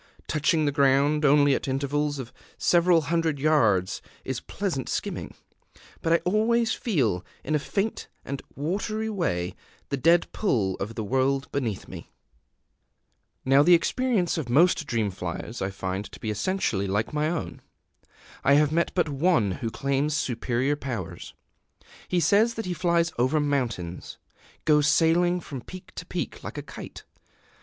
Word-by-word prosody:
Touching 155 +1 +1
the 145 - +2
ground 140 +1 +3
only 145 -1 +5
at - - -2
intervals 145 +2 -1
of 130 -3 -7 0.2
several 175 -1 +4
hundred 165 0 0
yards 115 -11 +2 0.2
is - - -2
pleasant - - -3
skimming; - - -4 0.7
but 165 - 0
I - - +6
always 220 +4 +2
feel, 120 - 0 0.2
in 155 - -2
a 150 - +3
faint 200 +8 -2 0.2
and 140 0 -4
watery 210 +8 -2
way, 90 - -1 0.3
the 140 - -1
dead 165 +6 +4
pull 110 - 0
of 105 +4 -5
the 110 - -3
world 135 +5 0
beneath 120 -8 -3
me. - - -10 1.4
Now 135 +2 +6
the 175 +4 +7
experience 200 -2 +1
of 135 -6 -5
most 155 +3 +4
dream 110 -5 0
flyers 90 +5 -6
I 95 - 0
find 95 +1 -4
to - - -11
be 110 - -3
essentially 105 - -1
like 105 +8 -1
my 150 +1 +1
own. 170 -2 -4 0.8
I 140 - +5
have 150 0 +4
met 170 +2 +1
but 175 -3 +2
one 145 - +2
who 115 +5 -3
claims 140 +5 0
superior 125 +1 0
powers: 105 - -6 0.7
he 180 - +1
says 205 +8 +3
that 225 - -4
he 180 - -2
flies 170 0 +1
over 130 +5 +2
mountains 120 - -2 0.5
goes 150 -1 +4
sailing 175 +3 +3
from 135 -5 -7
peak 185 +8 -11
to - - -8
peak - - -4
like - - -7
a - - -4
kite. - - -10
145 Hz, 155 wpm, -26 LUFS, 120-170 Hz, 1.4 s, the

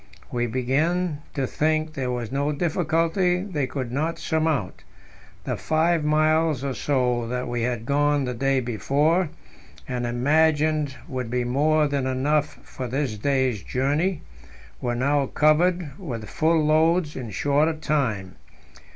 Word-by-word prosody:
We 120 0 0
began 145 +7 0
to 135 -3 0
think 155 +3 0
there 130 -3 -3
was 120 -3 -3
no 140 +2 0
difficulty 170 +3 +1
they 155 -10 -2
could 130 -3 -4
not 155 +6 -1
surmount; 155 - -1 0.6
the - - -2
five 160 +1 +1
miles 155 -1 +2
or 140 -1 -2
so 125 -4 0
that 125 +1 -3
we 120 -1 -2
had 120 -1 -2
gone 145 +1 +2
the 125 - -2
day 135 +2 +1
before, 145 - +1 0.6
and 125 -1 -2
imagined 150 +3 +2
would 130 -5 -4
be 125 +1 0
more 150 +5 +2
than 140 -2 -1
enough 145 +3 0
for 130 - -6
this 130 -2 -2
day's 130 -1 0
journey, 145 - 0 0.6
were 120 -1 -1
now 140 +2 +1
covered 160 +2 +2
with 120 - -6
full 160 -1 +2
loads 160 +1 +2
in 125 -4 -5
shorter 145 - +1
time. 125 -12 -2
145 Hz, 140 wpm, -24 LUFS, 125-155 Hz, 0.6 s, miles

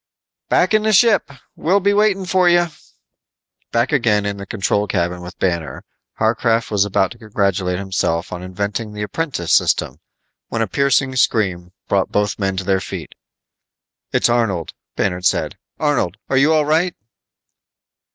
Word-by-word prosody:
"Back - - +3
in 215 - +4
the 215 0 +1
ship. 205 -3 +4 0.3
We'll 185 +5 +2
be 200 +1 +2
waiting 205 -2 +2
for 185 0 +3
you." 175 0 +3 1.0
Back 115 +4 +1
again 115 -8 +2
in 100 0 -2
the 100 0 -8
control 105 0 0
cabin 90 -2 -1
with 90 +1 -10
Banner, 85 -4 -2 0.3
Harcraft 115 +1 +1
was 100 -1 +2
about 95 -2 +1
to 120 - -12
congratulate 100 -4 -1
himself 90 -3 -2
on 90 - -5
inventing 100 +4 -4
the 105 0 -4
apprentice 105 - -2
system, 65 - +2 0.5
when 115 -1 -1
a - - -2
piercing 135 +2 +1
scream 90 -8 +1 0.2
brought 95 -2 +1
both 105 0 0
men 95 -1 -1
to 95 - -2
their 95 0 +1
feet. - - -7 1.0
"It's - - +3
Arnold," 115 -9 0 0.2
Banner 90 -1 -1
said. 90 - 0 0.2
"Arnold, - - 0
you 135 +4 +4
all 155 -2 +3
right?" 165 +4 +1
105 Hz, 150 wpm, -19 LUFS, 95-145 Hz, 1.0 s, in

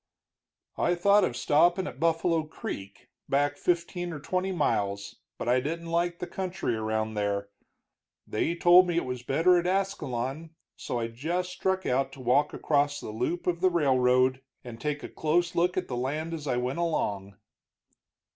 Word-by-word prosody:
"I 175 - +2
thought 200 +4 +4
of 120 - -1
stopping 175 +5 +3
at 135 - -7
Buffalo 165 0 +2
Creek, 100 -10 -8 0.2
back 145 +1 +2
fifteen 175 +2 -1
or 155 - -6
twenty 185 +5 -1
miles, 100 - -1 0.2
but - - -5
I 125 +1 +4
didn't 165 +5 -4
like 170 0 0
the 180 - -4
country 185 -9 -3
around 110 0 -2
there. 100 -1 -1 0.8
They 165 +10 -1
told 175 +1 +6
me 175 -1 0
it - - +1
was 125 -1 -4
better 165 +8 +3
at 175 - -2
Ascalon, 160 -5 -2 0.2
so 125 - -4
I 115 -1 -1
just 170 +10 -3
struck 190 +1 -1
out 135 +1 +1
to - - -12
walk 130 +4 +2
across 145 -1 +1
the - - -7
loop 125 +11 -2
of 170 -1 -1
the 185 - +5
railroad 130 -5 +3 0.2
and 120 -2 -9
take 150 -1 -2
a - - -4
close 175 +3 0
look 180 +2 +1
at 185 - -1
the 125 - -4
land 150 +7 -2
as 155 -3 -5
I 125 - 0
went 125 +5 -2
along." 100 - -1
150 Hz, 175 wpm, -28 LUFS, 125-175 Hz, 0.8 s, told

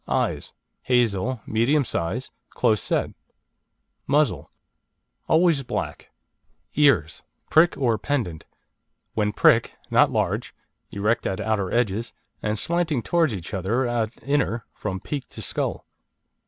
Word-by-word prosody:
Eyes: - - -1 0.3
hazel, 120 -1 +1
medium 130 +6 +2
size, 110 +7 -3 0.2
close 110 -4 +1
set. - - 0 1.0
Muzzle: 140 - +1 0.8
always 160 -3 +4
black. - - -4 0.7
EARS 140 - +3 0.3
(PRICK 165 +2 +5
OR 120 -5 +1
PENDANT) 115 - -2 0.7
When 105 -1 +1
prick, - - +4 0.2
not - - +5
large, - - -1 0.3
erect 105 +4 0
at 95 - -2
outer 105 -4 -1
edges, 115 -1 0 0.3
and 110 0 -1
slanting 165 -3 0
towards 170 -4 +2
each 95 -4 -6
other 105 +7 0
at 120 -2 0
inner, 135 -5 0
from 95 -3 -4
peak 140 +6 -5
to - - -9
skull. - - -3
120 Hz, 115 wpm, -24 LUFS, 105-140 Hz, 1.0 s, PRICK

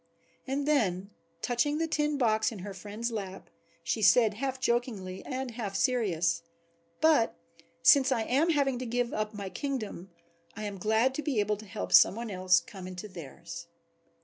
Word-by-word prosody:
And 275 +2 -1
then, 200 -9 +1 0.3
touching 250 +5 +1
the 325 - +1
tin 300 -2 0
box 220 -4 +2
in 225 - -7
her 200 - -6
friend's 210 +5 -5
lap, 195 -4 -6 0.3
she 220 +7 -1
said 220 +1 +5
half 260 +4 -3
joking 235 -6 0 0.2
and 260 -1 -3
half 220 -4 -5
serious, 175 -11 +1 0.6
"but 310 -8 +4 0.5
since 275 -2 +6
I 235 -4 +1
am 280 +9 +2
having 275 -5 +1
to 255 - -4
give 245 +1 -1
up 215 0 -2
my 200 -2 -5
kingdom 220 -10 -4 0.5
I 215 - -6
am 200 -2 -5
glad 220 +6 +2
to 300 - -3
be 285 -8 -1
able 210 0 +1
to 215 +1 -12
help 210 +2 -5
some - - +7
one 230 -1 -5
else 185 -2 +3
to - - -24
come 190 -3 -9
into 185 +3 -7
theirs." 170 -1 -9
220 Hz, 175 wpm, -29 LUFS, 195-260 Hz, 0.6 s, some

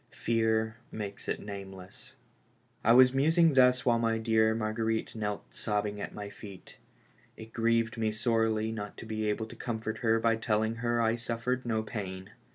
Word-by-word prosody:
Fear 110 -1 +1
makes 100 -2 -6
it - - -1
nameless. 95 -2 -9 0.7
I 115 - +4
was 125 +1 +7
musing 160 +4 +4
thus 125 -1 +4
while 120 -1 +3
my 115 -1 +1
dear 110 -1 +2
Marguerite 110 0 -1
knelt 105 -2 -4
sobbing 105 -1 -2
at - - -5
my 105 -1 -7
feet. 100 -2 -12 0.6
It 110 +1 -11
grieved 115 -1 +1
me 110 -1 +1
sorely 110 0 +1
not 105 -2 -6
to - - -8
be 110 -1 -2
able 110 +1 -1
to 110 - -11
comfort 110 -2 -4
her 115 -1 +2
by 115 0 +2
telling 110 0 0
her 120 0 0
that 115 - +2
I 115 +1 +2
suffered 120 +1 -2
no 110 -2 0
pain. 95 -4 -6
110 Hz, 170 wpm, -30 LUFS, 105-115 Hz, 0.7 s, was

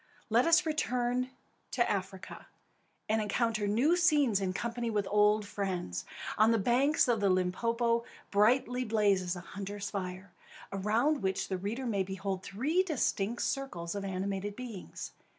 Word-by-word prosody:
Let 240 +7 +4
us 335 +1 +5
return 250 -5 0 0.4
to 240 -2 +1
Africa, 190 -1 -4 0.6
and 220 +1 +1
encounter 215 0 0
new 250 +12 +3
scenes 295 - +3
in 190 -1 0
company 235 +4 -3
with 205 -3 -1
old 210 0 +4
friends. 185 - -3 0.3
On 215 +1 +6
the 230 - +4
banks 255 +9 +3
of 235 -3 +2
the 200 -1 +2
Limpopo 230 +6 +1 0.3
brightly 250 +4 +3
blazes 200 -5 +1
a 175 - -7
hunter's 200 +2 -6
fire, 185 -1 -5 0.4
around 220 +10 +1
which 190 -1 -1
the 190 - -1
reader 220 +7 -3
may 205 -5 0
behold 190 0 -3
three 270 - 0
distinct 240 - -1
circles 175 -12 -3
of 200 -1 -4
animated 195 +1 -3
beings. 235 -6 -7
210 Hz, 145 wpm, -31 LUFS, 195-245 Hz, 0.6 s, On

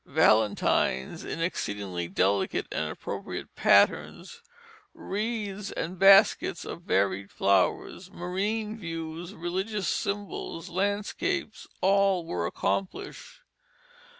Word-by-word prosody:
Valentines 110 - +2
in - - -5
exceedingly 100 - -3
delicate 95 +3 +1
and - - -2
appropriate - - -6
patterns, 470 0 +2 0.5
wreaths 210 -1 -3
and 175 +2 -4
baskets 195 -2 +5
of - - -7
varied 100 - 0
flowers, 100 - +1
marine 205 +5 -2
views, 165 +1 -6
religious 190 +4 -3
symbols, 200 -4 -3
landscapes, 200 +3 -2
all 195 -2 +3
were 85 - -2
accomplished. 195 - -4
180 Hz, 90 wpm, -28 LUFS, -, 0.5 s, baskets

